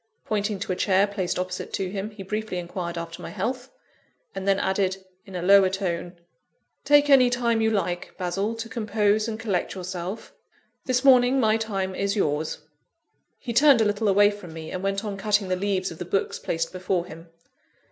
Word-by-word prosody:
Pointing 210 -1 -1
to 195 - -3
a - - 0
chair 190 +1 +3
placed 190 -3 -3
opposite 185 0 -4
to 185 -2 -2
him, 200 +1 -4
he 210 -2 -10
briefly 210 0 -3
inquired 175 0 -5
after 165 0 -6
my - - -7
health; 245 +6 -3 0.6
and 195 - -5
then 195 0 +3
added, 190 0 0 0.3
in 190 - -10
a 175 - -3
lower 195 0 +6
tone 175 -2 -3 0.7
"Take 290 0 +5
any 265 -3 +6
time 235 -2 +1
you 220 - +3
like, 180 -5 -2
Basil, 195 +5 -2
to 230 0 -5
compose 215 -1 +1
and 220 -1 -4
collect 200 -6 -2
yourself. 185 +3 -6 0.5
This 255 0 +1
morning 255 0 +6
my 220 -3 +3
time 195 -4 -2
is 200 +2 -1
yours." 155 -5 -1 0.7
He 240 -3 -5
turned 275 +1 +6
a 220 - +3
little 205 +1 0
away 205 +1 +5
from 195 -5 -10
me, 160 -1 -8
and 185 - -4
went 195 +2 -1
on 200 -2 -4
cutting 205 -1 +1
the 185 - +1
leaves 190 -1 -1
of 165 - -10
the - - -3
books 195 +3 -1
placed 165 0 -2
before 185 -1 -1
him. 165 -1 -12
195 Hz, 190 wpm, -25 LUFS, 185-220 Hz, 0.7 s, lower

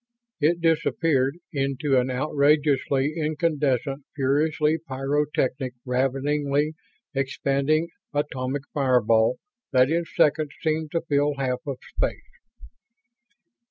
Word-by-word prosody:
It 165 +3 +2
disappeared 160 -3 +1 0.2
into 135 -1 +1
an 125 +1 -1
outrageously 140 +1 +2
incandescent, 150 -4 0
furiously 150 +3 +1
pyrotechnic, 135 -2 -1
raveningly 140 +3 0 0.4
expanding 140 +3 0 0.2
atomic 140 -2 -2
fireball 125 -4 +3 0.4
that 130 +2 +4
in 170 +1 +1
seconds 150 -2 +1
seemed 155 -1 0
to 165 - +1
fill 145 -2 +1
half 130 -2 -1
of 135 -2 -3
space. - - -4
145 Hz, 90 wpm, -25 LUFS, 135-155 Hz, 0.4 s, that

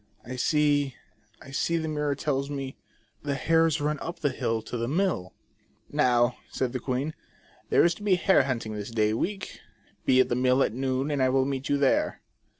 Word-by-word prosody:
" - - -29
I 125 +2 -6
see, 145 0 +2 0.5
I 135 - -12
see, 165 +5 0
the 160 -1 -2
mirror 150 -2 -1
tells 140 -1 -1
me, 135 -2 -5 0.5
The 145 -1 -2
hares 165 +3 +2
run 150 +1 -1
up 170 - -5
the 145 -3 0
hill 115 -3 -2
to - - -6
the 115 0 -1
mill." 155 - -1 0.3
" - - -38 0.3
Now", 120 0 +3
said 130 -1 -2
the 130 - -2
queen, 130 +5 -2 0.3
" - - -31
there - - +5
is 170 - +3
to - - -14
be 205 -2 +3
a - - +4
hare 180 -6 +4
hunting 115 -5 -3
this 105 0 -5
day 110 -2 +1
week; 195 - -3 0.5
be 130 -1 +4
at 130 - +5
the 120 - +1
mill 130 +1 +3
at - - -1
noon, 130 +3 -1
and 145 -2 0
I 130 - +4
will 130 0 +2
meet 135 -1 -3
you 145 - +3
there." 140 -1 +2
135 Hz, 220 wpm, -27 LUFS, 125-150 Hz, 0.5 s, there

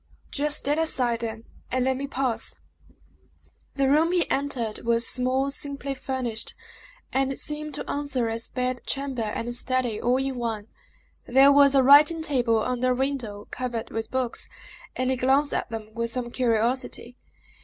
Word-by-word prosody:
"Just 295 +1 +3
stand 295 +3 0
aside, 250 -7 +2
then, 225 -1 -5 0.3
and 255 0 0
let 265 0 +2
me 275 +2 -4
pass." 260 -4 -1 1.2
The 275 -1 +2
room 310 +5 +3
he 355 -2 +2
entered 260 -6 -1
was 235 0 +2
small, 260 +2 +1
simply 280 -1 -3
furnished, 260 -4 -3 0.6
and 270 0 +1
seemed 300 -1 -2
to - - -6
answer 280 -4 -1
as 225 0 -3
bed 250 -1 -2
chamber 275 -3 -2
and 230 +2 -3
study, 245 -3 0
all 245 +2 +2
in 265 -1 -2
one. 225 -3 -4 0.6
There 270 +3 +6
was 280 -1 +6
a 270 - +5
writing 295 +4 +6
table 240 -7 +1
under 255 0 0
a - - -2
window, 250 -6 -3
covered 240 -3 -4
with 225 0 -4
books, 255 -2 -2 0.5
and 255 +1 0
he 260 - 0
glanced 270 +3 +2
at - - -2
them 220 -1 -7
with 230 0 -2
some 240 0 -3
curiosity. 240 +1 -1
255 Hz, 160 wpm, -25 LUFS, 235-275 Hz, 1.2 s, There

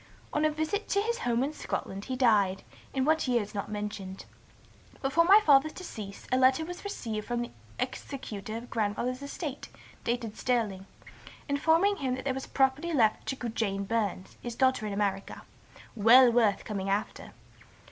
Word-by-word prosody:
On 300 - +1
a 310 - +4
visit 315 +8 -2
to 400 - +2
his 465 +3 -1
home 240 +1 +1
in 290 +3 -2
Scotland 195 -8 -4
he 260 - -3
died, 205 -7 +3 0.3
in 265 -1 0
what 315 -1 +2
year 240 -3 +2
is 205 - -11
not 200 -1 -4
mentioned. 205 -2 -5 0.7
Before 285 +5 +2
my 395 +4 +8
father's 290 +1 +5
decease, 215 - -8
a 255 - +3
letter 260 +4 +4
was 355 +2 -8
received 225 - -4
from 240 0 -1
the 240 - -8 0.3
executor 220 -5 -5
of 235 +1 -10
grandfather's 235 +4 -1
estate, 280 0 -6 0.3
dated 235 -2 -2
Stirling, 215 -6 -1 0.6
informing 325 +8 +3
him 260 -3 -1
there 260 +1 -2
was 265 0 -5
property 275 +5 +1
left 220 -6 +2
to 255 -3 -3
Jane 200 -3 -1
Burns, 200 -3 -2
his 240 -1 -5
daughter 260 -4 +2
in 205 - -3
America, 200 -1 -2 0.5
'well 235 +3 +7
worth 225 -4 +2
coming 195 -2 -3
after.' 205 +2 -2
245 Hz, 165 wpm, -29 LUFS, 210-280 Hz, 0.7 s, my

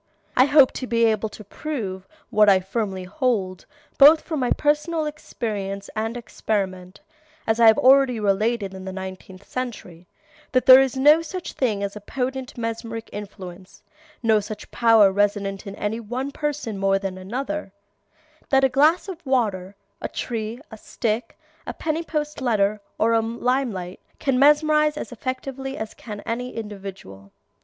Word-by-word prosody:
I 255 - +6
hope 285 -2 +6
to 255 - -6
be 230 -1 +2
able 220 -1 +1
to 215 - -11
prove, 200 -6 -5 0.2
what 210 -1 +5
I 190 -1 +6
firmly 190 -1 -3
hold, 195 - -2 0.3
both 300 +3 +8
from 315 -3 -4
my 250 - 0
own - - +3
personal 305 +2 0
experience 205 -9 -5
and 225 +2 -2
experiment, 195 -5 -4 0.4
as 220 +1 +1
I 230 - +7
have 220 - +7
already 260 -2 +5
related 205 0 0
in 190 0 -8
the 190 - -5
Nineteenth 190 0 -9
Century, 195 -9 -6 0.5
that 255 -1 +2
there 260 0 +10
is 265 -1 -1
no 295 +4 +6
such 350 +2 -6
thing 215 -6 -1
as 200 0 -4
a 210 - -8
potent 260 +3 -4
mesmeric 230 0 -5
influence, 190 -3 -9 0.4
no 220 -2 +4
such 210 0 -8
power 225 -4 +5
resident 200 0 -1
in 200 - -6
any 210 +3 -3
one 250 +5 -4
person 290 -8 -3
more 195 0 +2
than 195 -1 -4
another; 260 +5 -4 0.8
that 270 -1 +4
a 265 - +5
glass 300 +9 +3
of 355 -3 -8
water, 205 -8 -1 0.3
a - - -3
tree, 225 0 -4
a 220 - -9
stick, 225 +1 -3 0.3
a - - -5
penny 315 +1 -2
post 300 -3 -4
letter, 210 -4 +1 0.2
or 230 +1 +2
a 225 - +4
lime 245 +3 -1
light 180 -1 -7 0.2
can 265 -2 0
mesmerize 300 +1 +4
as - - -6
effectually 265 +2 -5
as 220 0 -5
can 210 -3 -8
any 245 +2 -4
individual. 195 - -8
225 Hz, 165 wpm, -23 LUFS, 200-265 Hz, 0.8 s, there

